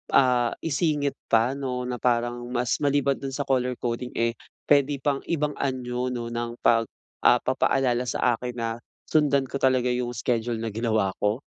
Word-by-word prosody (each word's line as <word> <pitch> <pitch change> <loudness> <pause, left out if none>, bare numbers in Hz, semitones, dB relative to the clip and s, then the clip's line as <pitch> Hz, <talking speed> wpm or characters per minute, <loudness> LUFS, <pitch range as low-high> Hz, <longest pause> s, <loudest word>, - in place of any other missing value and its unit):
ah 125 -3 +4
isingit 150 -2 0
pa 115 +2 +3
no 125 -2 -3
na 125 -1 -4
parang 120 0 0
mas 125 -1 0
maliban 140 -1 +2
dun 135 -1 -5
sa 140 - -1
color 125 -2 +1
coding 120 +1 -3
eh, 115 -1 0 0.3
puwede 145 0 +4
pang 140 -2 +1
ibang 150 -3 0
anyo 125 -2 -2
no 120 -2 -4
ng 120 0 -3
pag 115 -1 +4 0.3
ah 120 0 +5
papaalala 130 -1 +1
sa 120 -1 +1
akin 125 -1 -5
na 115 -1 -2 0.4
sundan 145 -3 +3
ko 140 - -2
talaga 130 -1 +3
yung 125 0 -2
schedule 120 0 -1
na 115 - -2
ginawa 110 -3 +1
ko? 105 +4 0
125 Hz, 170 wpm, -25 LUFS, 120-135 Hz, 0.4 s, ah